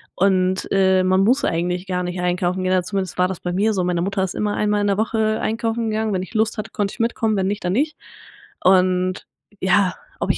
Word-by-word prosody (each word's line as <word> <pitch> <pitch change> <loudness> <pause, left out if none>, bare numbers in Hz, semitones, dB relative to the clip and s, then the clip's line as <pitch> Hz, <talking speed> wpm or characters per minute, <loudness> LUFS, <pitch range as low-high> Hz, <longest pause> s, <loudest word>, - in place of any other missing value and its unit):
und, 185 0 +1
äh, 190 -1 +3
man 185 +1 +3
muss 250 +7 +3
eigentlich 180 +2 -1
gar 180 -1 -1
nicht 180 0 -4
einkaufen 180 +1 0
gehen, 185 0 +1
also 185 -1 0
zumindest 195 -3 -3
war 180 - +4
das 185 -2 -5
bei 180 - -3
mir 210 +4 +2
so. 190 -3 0
Meine 175 -1 0
Mutter 195 +1 -1
ist 185 - -3
immer 210 -1 -1
einmal 210 0 +1
in 205 - +1
der 200 -1 +1
Woche 220 0 0
einkaufen 225 +1 -1
gegangen. 220 0 -1
Wenn 185 -1 -1
ich 190 - -11
Lust 220 0 0
hatte, 215 - -5
konnte 200 -1 -2
ich - - -13
mitkommen, 225 -1 0
wenn 190 -1 0
nicht, 205 +1 -3
dann 180 - 0
nicht. 300 +7 0 0.7
Und 185 0 +2 0.4
ja, 190 0 +3 0.3
ob - - +1
ich - - -2
190 Hz, 235 wpm, -21 LUFS, 185-215 Hz, 0.7 s, war